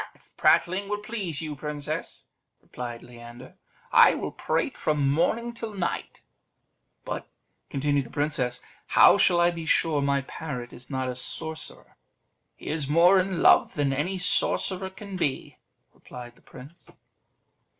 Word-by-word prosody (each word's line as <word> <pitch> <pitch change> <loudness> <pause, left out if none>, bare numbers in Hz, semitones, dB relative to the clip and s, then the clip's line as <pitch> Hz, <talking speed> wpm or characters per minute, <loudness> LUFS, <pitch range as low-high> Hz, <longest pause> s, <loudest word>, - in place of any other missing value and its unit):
"Ah! - - -12
if - - -29
prattling 195 +3 +2
will 210 - -1
please 205 -8 -4
you, 155 -2 -5
princess," 150 +2 -6 0.3
replied 120 -1 -8
Leander, 120 +1 -13 0.4
"I - - +6
will - - -4
prate - - -2
from 150 -2 0
morning 230 +10 0
till 225 -2 -7
night." 175 -3 -4 0.8
"But," - - -5 0.4
continued 140 0 0
the - - -16
princess, 135 -4 -2 0.3
"how - - +7
shall 175 - +4
I 175 0 +4
be 165 -2 -7
sure 155 -3 +2
my 140 0 +1
parrot 135 -3 -7
is 125 +1 -8
not 130 -1 -2
a 125 - -4
sorcerer?" 160 +5 -3 0.6
"He - - -16
is 150 -3 -2
more 175 +5 +5
in 185 -2 -1
love - - +5
than 140 -2 0
any 170 +8 -2
sorcerer 185 +1 +2
can 195 0 -9
be," 145 -6 -3 0.3
replied 120 -1 -11
the - - -26
prince. 140 +7 -14
150 Hz, 150 wpm, -26 LUFS, 135-180 Hz, 0.8 s, how